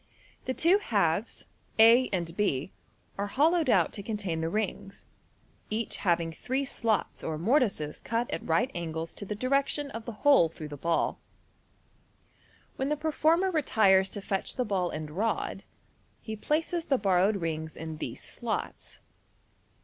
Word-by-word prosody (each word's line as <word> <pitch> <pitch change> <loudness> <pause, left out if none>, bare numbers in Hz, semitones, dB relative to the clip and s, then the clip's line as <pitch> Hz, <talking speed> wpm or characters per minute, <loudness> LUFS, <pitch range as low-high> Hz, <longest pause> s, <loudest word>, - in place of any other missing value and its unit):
The 260 - -2
two 360 +5 +4
halves, - - 0 0.3
a 230 +3 +7
and 170 -3 -2
b, 185 -7 0 0.5
are 200 - 0
hollowed 310 - +2
out 180 -8 +3
to 200 - -5
contain 195 -6 -3
the 160 - 0
Fig. 165 - -5
106. 215 -3 -1
rings, 195 - -14 0.6
each 220 +1 -2
having 170 -3 +1
three 260 +11 -2
slots 225 -5 -1
or 160 -1 -2
mor 230 - +3
tices 155 - -2
cut 235 +1 -1
at - - -3
right 220 +11 +1
angles 165 -1 -4
to 205 - -7
the 210 - -4
direction 275 +4 0
of 225 0 -7
the 235 - -4
hole 275 - +6
through 155 -1 -9
the 145 - -6
ball. 165 +4 0 1.6
When 265 +1 -1
the 300 - 0
performer 320 +4 +2
retires 200 - +3
to 205 - -6
fetch 195 -1 -2
the 250 - 0
ball 185 -4 0
and 155 -1 -5
rod, 210 +8 -2 0.5
he 220 - -6
places 325 +8 -1
the 270 - +3
borrowed 195 0 +3
rings 160 -3 -4
in 160 -1 -6
these - - -6
slots. - - -5
210 Hz, 160 wpm, -29 LUFS, 170-260 Hz, 1.6 s, a